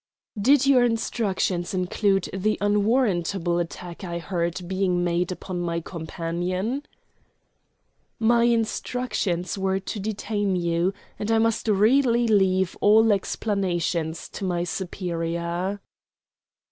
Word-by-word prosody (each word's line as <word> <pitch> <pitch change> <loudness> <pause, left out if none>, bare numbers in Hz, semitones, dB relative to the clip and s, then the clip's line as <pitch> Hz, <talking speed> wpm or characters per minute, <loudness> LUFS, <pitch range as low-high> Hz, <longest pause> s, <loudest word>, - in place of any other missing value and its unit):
"Did 275 +4 +5
your 265 -3 +5
instructions 200 -6 -1
include 195 +1 +1
the 210 +3 0
unwarrantable 200 -5 +1
attack 175 +1 -6
I 170 -2 -4
heard 170 0 -3
being 185 -1 0
made 175 +1 0
upon 185 0 -5
my 170 -1 -1
companion?" 175 - -3 1.4
"My 235 +1 +3
instructions 225 -6 -1
were 190 0 +1
to 195 +2 -5
detain 205 -1 -1
you, 170 +1 +1 0.3
and 210 - -3
I 225 - +4
must 225 0 +1
really 235 +3 +3
leave 190 -3 +2
all 220 +1 +6
explanations 175 -5 -1
to - - -7
my 175 -2 0
superior." 175 +1 -3
190 Hz, 110 wpm, -25 LUFS, 175-215 Hz, 1.4 s, all